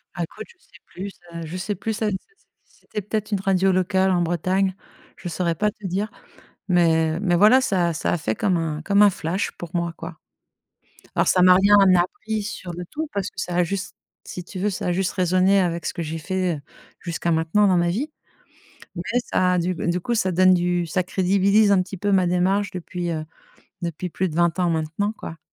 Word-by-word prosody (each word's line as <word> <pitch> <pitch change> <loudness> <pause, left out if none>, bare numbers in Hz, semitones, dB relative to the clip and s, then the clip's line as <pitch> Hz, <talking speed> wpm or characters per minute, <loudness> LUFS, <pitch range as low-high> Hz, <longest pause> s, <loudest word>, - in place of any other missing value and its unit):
Ah - - -2
écoute, - - -8
je 475 - -20
sais - - -21
plus 195 +3 -7
ce 170 -2 -10
je 180 +4 -5
sais 195 +2 -3
plus 220 +3 -4
a 215 - +2
c'est 190 - -1 0.5
c'était 210 - -8
peut 210 +3 -2
être 215 +1 -5
une 200 - +1
radio 190 0 +2
locale 190 +1 +2
en 175 -1 +2
Bretagne, 185 +3 0 0.4
je 175 - -6
saurais 170 0 -1
pas 210 0 +1
te 210 - -13
dire, 200 +5 -2 0.6
mais 165 -2 +3
mais 180 -4 +1
voilà, 215 +8 +6
ça 185 -8 +1
a - - -1
ça 165 - -1
a 175 - 0
fait 110 -6 -2
comme 185 -4 +1
un 155 -2 -2
comme 200 +3 +4
un 205 - +7
flash 175 +2 -2
pour 170 -2 -9
moi, 170 -1 -1
quoi. 165 -1 -8 1.0
Alors - - +2
ça 180 - +4
m'a 180 0 +7
rien 200 +2 +5 0.2
appris 215 +4 -2
sur 205 -4 -6
le 175 +1 -6
tout 315 +1 -4
parce 200 -1 -2
que 185 - -11
ça 175 -1 -3
a 180 - +4
juste 190 +2 -4 0.3
si 180 - -7
tu 185 +1 -8
veux, 210 +2 +1
ça 185 - -4
a - - +1
juste 185 +1 0
résonné 185 +2 +3
avec 170 -2 -1
ce - - -2
que 170 - -5
j'ai 160 +1 -4
fait, 185 -1 -1
heu, - - -12 0.4
jusqu'à 170 0 -2
maintenant 165 +6 +2
dans 185 -2 +3
ma 175 0 +2
vie. 275 - -2 0.9
Ouais 230 +8 -1
ça 180 0 +1
a - - +1
du 180 +2 0
du 175 +2 -1
coup 240 +6 -2
ça 190 -5 +1
donne 185 +1 +5
du 175 -1 0
ça 180 +3 0
crédibilise 200 +3 +3
un 190 - +4
petit 195 +1 -8
peu 205 +3 -1
ma 185 -2 +4
démarche 190 +3 +1
depuis, 175 -1 -5
heu, 155 -1 -3 0.6
depuis 170 +1 -4
plus 185 +2 -1
de 155 - -8
20 170 +1 +2
ans 175 -1 +2
maintenant 165 +6 -1
quoi. 165 -6 -9
185 Hz, 225 wpm, -23 LUFS, 170-200 Hz, 1.0 s, un